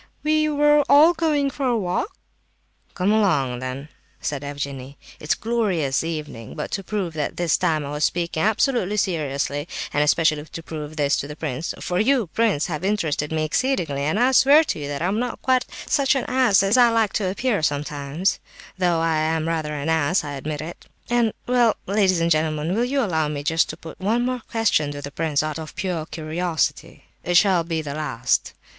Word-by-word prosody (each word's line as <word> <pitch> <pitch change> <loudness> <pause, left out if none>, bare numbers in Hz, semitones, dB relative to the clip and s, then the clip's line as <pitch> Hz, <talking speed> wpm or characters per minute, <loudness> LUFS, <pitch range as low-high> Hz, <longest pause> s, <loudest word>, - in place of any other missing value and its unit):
"We 310 0 +2
were 295 0 +4
all 310 +4 +7
going 300 -4 +1
for 275 -1 -2
a 240 -2 +2
walk—" 185 - -2 0.8
"Come 190 +2 +1
along 145 - +2
then," 130 +3 -6 0.3
said 145 -1 -3
Evgenie; 140 -1 -6 0.2
"it's 150 - 0
a - - -18
glorious 185 - 0
evening. 150 -9 -6
But, - - -5
to 195 - -3
prove 190 -4 -3
that 150 -2 -3
this 175 -3 +2
time 155 -2 0
I 140 - -6
was 150 +1 -2
speaking 170 -2 -1
absolutely 220 - +1
seriously, 145 -5 -1 0.3
and 145 - +2
especially 155 0 +2
to 165 +1 -9
prove 155 -1 -7
this 145 -1 +1
to 140 - -3
the 150 - -8
prince 155 0 -4
(for 180 0 -1
you, 250 +1 +3
prince, 220 -10 +2
have 165 0 -4
interested 165 -7 -1
me 160 -1 0
exceedingly, 165 - 0
and 155 +9 0
I 250 +2 +4
swear 280 +4 +6
to 285 - -3
you 145 - -5
that 145 +2 -3
I - - +1
am 205 +4 0
not 245 0 -3
quite 255 -1 +2 0.2
such 280 -3 +2
an 270 - -1
ass 235 -8 +3
as 200 +5 +3
I 245 -1 +7
like 225 -3 +1
to 195 -4 0
appear 210 +1 0
sometimes, 145 +3 -1 0.4
although 175 -3 +2
I 165 -1 +1
am 160 +1 0
rather 155 -2 -2
an 145 +1 -4
ass, 160 +2 +2
I 145 - -5
admit), 155 +4 -6 0.3
and—well, 240 0 +2
ladies 195 -3 +2
and 170 0 +1
gentlemen, 155 +1 +1
will 230 +4 +1
you 270 +2 0
allow 160 -7 0
me 145 -1 -4
to 160 +1 +1
put 165 -1 -11
just - - -12
one 230 +5 +1
more 255 -1 -2
question 205 -10 +1
to 145 - -7
the 140 - -6
prince, 155 -1 0
out 155 +1 -3
of 155 -1 -8
pure 175 -5 -3
curiosity? 165 +1 -2 0.2
It 175 0 +3
shall 185 -3 +4
be 165 -1 -3
the 140 -2 -5
last. 130 -5 -1
165 Hz, 200 wpm, -23 LUFS, 150-220 Hz, 0.8 s, all